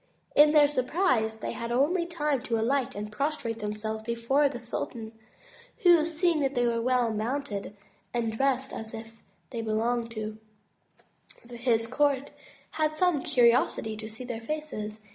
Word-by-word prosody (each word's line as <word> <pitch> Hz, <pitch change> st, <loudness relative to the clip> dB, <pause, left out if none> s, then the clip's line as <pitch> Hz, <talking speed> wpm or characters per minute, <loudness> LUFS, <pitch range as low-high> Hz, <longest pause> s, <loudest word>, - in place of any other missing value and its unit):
In 295 Hz, +1 st, +7 dB
their 300 Hz, -1 st, +6 dB
surprise 255 Hz, -, +1 dB
they 220 Hz, -, -5 dB
had 235 Hz, 0 st, -5 dB
only 330 Hz, +8 st, +2 dB
time 300 Hz, -6 st, -1 dB
to 230 Hz, -, 0 dB
alight 255 Hz, +3 st, 0 dB
and 210 Hz, +1 st, -5 dB
prostrate 235 Hz, -2 st, -2 dB
themselves 215 Hz, +1 st, -4 dB
before 235 Hz, +6 st, +1 dB
the 260 Hz, -, -6 dB
sultan, 230 Hz, -1 st, -5 dB, 0.7 s
who 345 Hz, -4 st, +6 dB
seeing 335 Hz, 0 st, +1 dB
they 270 Hz, -3 st, +1 dB
were 230 Hz, -1 st, +1 dB
well 245 Hz, -2 st, +2 dB
mounted 215 Hz, -3 st, -3 dB, 0.3 s
and 230 Hz, -2 st, -1 dB
dressed 270 Hz, +1 st, 0 dB
as 220 Hz, 0 st, -6 dB
if 225 Hz, 0 st, -10 dB, 0.3 s
they 235 Hz, -3 st, -3 dB
belonged 230 Hz, +2 st, 0 dB
to 215 Hz, -1 st, -5 dB, 1.1 s
his 235 Hz, -1 st, +1 dB
court, 280 Hz, +2 st, +1 dB, 0.4 s
had 310 Hz, -1 st, 0 dB
some 345 Hz, -3 st, +2 dB
curiosity 245 Hz, -6 st, +3 dB
to 215 Hz, 0 st, -7 dB
see 225 Hz, +3 st, -7 dB
their 240 Hz, -2 st, -5 dB
faces. 225 Hz, -6 st, -4 dB
240 Hz, 145 wpm, -28 LUFS, 225-290 Hz, 1.1 s, In